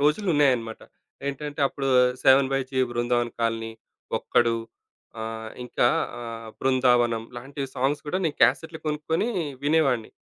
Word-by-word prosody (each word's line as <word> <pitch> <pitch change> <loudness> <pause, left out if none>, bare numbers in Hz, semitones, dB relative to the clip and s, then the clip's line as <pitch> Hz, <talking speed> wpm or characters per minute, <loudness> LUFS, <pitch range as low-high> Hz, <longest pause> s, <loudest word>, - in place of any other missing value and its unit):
రోజులున్నాయన్నమాట. 145 - +2 0.5
ఏంటంటే 145 +1 -4
అప్పుడు 135 0 -3 0.3
'seven 135 0 +5
by 135 - +2
G 130 - -2
Brindavan 120 0 0
colony', 115 -1 -1 0.4
'ఒక్కడు' 115 -1 +2 0.7
ఆహ్, 110 0 -5
ఇంకా 120 - +1 0.3
ఆహ్, 115 -1 -7
'బృందావనం' 125 -3 +2
లాంటి 135 +4 -6
సాంగ్స్ 135 +3 0
కూడా 180 +5 -1
నేను 155 - -1
క్యాసెట్‌లు 160 0 +2
కొనుక్కొని 155 +7 -1 0.4
వినేవాడిని. 140 -7 +2
130 Hz, 115 wpm, -25 LUFS, 115-145 Hz, 0.7 s, seven